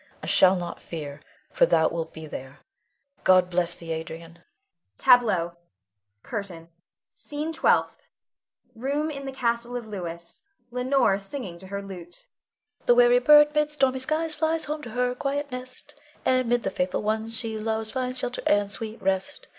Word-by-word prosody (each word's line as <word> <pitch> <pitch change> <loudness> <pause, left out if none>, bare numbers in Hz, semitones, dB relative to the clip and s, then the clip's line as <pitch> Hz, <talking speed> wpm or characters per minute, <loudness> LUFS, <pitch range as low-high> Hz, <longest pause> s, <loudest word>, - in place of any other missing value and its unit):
I - - -4
shall 185 0 +5
not 175 -1 -5
fear, 150 -3 -7 0.3
for - - +4
thou 160 - +4
wilt 165 -1 -4
be 160 0 -9
there. 135 -2 -9 0.6
God 185 -1 +5
bless 175 -1 +1
thee, 165 -1 -8
Adrian. 165 +1 -6 0.6
[Tableau. 185 -9 +4 0.7
CURTAIN. 180 -6 -6 0.5
SCENE 300 +2 -5
TWELFTH. - - +2 0.7
[Room 280 +6 -1
in 275 -2 -6
the - - -3
castle 235 -1 -1
of 240 - -6
Louis. 170 -5 -7 0.3
Leonore 250 -5 +2
singing 195 -4 -7
to 190 - -10
her 200 +1 -5
lute.] 175 -3 -9 0.6
The 485 - +6
weary - - +6
bird 295 -6 +7
mid 300 0 +1
stormy 265 -3 +2
skies, 310 +4 0
Flies 320 +1 0
home 300 +1 -3
to 245 - -8
her 245 +2 0
quiet 280 +2 -3
nest, 255 0 -7 0.3
And 255 -2 +2
'mid 240 0 +2
the 195 - -1
faithful 180 +1 -1
ones 220 +1 -1
she 225 -2 -3
loves, 220 0 -2
Finds 255 -1 -2
shelter 250 0 -3
and 205 0 +2
sweet 220 +1 -5
rest. 190 +9 -1
225 Hz, 160 wpm, -26 LUFS, 180-270 Hz, 0.7 s, bird